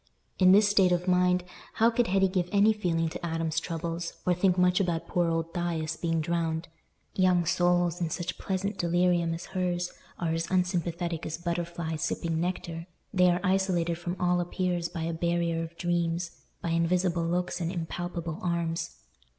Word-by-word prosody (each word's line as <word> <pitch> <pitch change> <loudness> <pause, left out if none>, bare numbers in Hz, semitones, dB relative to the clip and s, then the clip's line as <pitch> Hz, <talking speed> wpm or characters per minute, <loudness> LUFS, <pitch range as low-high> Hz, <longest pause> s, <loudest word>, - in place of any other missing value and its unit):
In 185 -1 +7
this 205 +2 +6
state 195 -3 +4
of 175 +1 0
mind, 180 0 +3 0.3
how 230 +1 +4
could 240 0 +1
Hetty 195 +1 +3
give 185 -2 -1
any 205 +2 +5
feeling 170 -6 0
to 160 - -8
Adam's 165 -1 -1
troubles, 170 0 -4
or 180 - +4
think 180 +1 +2
much 180 +1 +4
about 175 -4 -1
poor 175 -1 +1
old 165 0 -2
Thias 165 -2 -2
being 165 -1 -1
drowned? 165 0 -1 0.5
Young 180 -2 +3
souls, 175 0 +2
in 170 - 0
such 175 +2 -4
pleasant 195 +2 -2
delirium 175 -1 +2
as 170 - -7
hers 180 -1 -1 0.3
are 165 -2 -1
as 165 +1 -2
unsympathetic 175 -2 -1
as 160 - -4
butterflies 170 -2 -3
sipping 165 -1 -1
nectar; 170 -1 -3 0.3
they 180 -2 +5
are 175 0 +1
isolated 180 -3 +1
from 175 +1 -4
all 180 0 +2
appeals 175 -1 -1
by 165 -3 -4
a 165 +1 -2
barrier 170 0 0
of 165 0 -7
dreams—by 170 0 -2
invisible 170 +1 +1
looks 180 +1 -1
and 170 0 -1
impalpable 170 -1 -4
arms. 170 -1 -2
175 Hz, 165 wpm, -28 LUFS, 165-180 Hz, 0.5 s, In